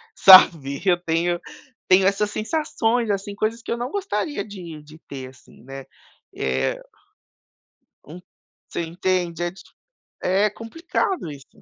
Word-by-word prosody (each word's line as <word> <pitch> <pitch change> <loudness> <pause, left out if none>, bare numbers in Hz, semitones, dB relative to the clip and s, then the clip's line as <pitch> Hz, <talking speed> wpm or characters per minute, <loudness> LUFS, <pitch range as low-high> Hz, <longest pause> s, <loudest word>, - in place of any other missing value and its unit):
Sabe? 165 -7 +7
Eu 180 -2 +4
tenho 170 +1 0 0.5
tenho 185 +1 +5
essas 205 +1 0
sensações, 235 -2 -1
assim, 200 0 -3
coisas 220 +3 -2
que - - -7
eu 235 - -1
não 245 +3 -4
gostaria 295 - -3
de 170 -7 -9
de 155 +1 -15
ter 130 -4 -9
assim, 130 +1 -19
né, 135 +1 -9 0.5
é 65 -1 -1 1.3
Um 160 +5 -10 0.5
Você - - -4
entende? 175 0 -2
É 175 - -2
dif 190 - -16 0.6
é 195 +3 +3
complicado 325 - -3
isso. 140 -1 -13
185 Hz, 135 wpm, -22 LUFS, 160-215 Hz, 1.3 s, Sabe